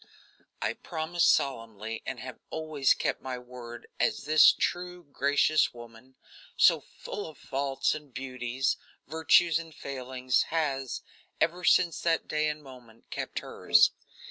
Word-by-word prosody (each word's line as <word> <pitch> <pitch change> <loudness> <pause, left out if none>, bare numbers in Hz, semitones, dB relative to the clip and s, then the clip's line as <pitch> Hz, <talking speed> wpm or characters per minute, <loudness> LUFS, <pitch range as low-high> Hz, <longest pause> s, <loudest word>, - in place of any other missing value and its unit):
I - - 0
promised 170 +1 +1
solemnly 115 -4 -2
and 120 - -4
have 130 -1 -8
always 155 -4 +1
kept - - -2
my 130 -1 -4
word, 125 -1 -10
as - - +1
this 155 +2 +7
true, 180 0 -3
gracious 145 0 +2
woman, 120 +2 -13 0.4
so - - +6
full 205 - -7
of 155 - -12
faults 135 0 -1
and 150 -2 -9
beauties, 130 0 -2 0.3
virtues 160 +1 +4
and 165 -1 -10
failings, 130 -1 -1
has, 140 -5 -1 0.4
ever 175 +2 +1
since 175 -2 +3
that 165 -1 +1
day 155 0 +1
and 150 0 -5
moment, 125 -4 -15
kept - - -4
hers. - - +4
140 Hz, 135 wpm, -29 LUFS, 125-160 Hz, 0.4 s, this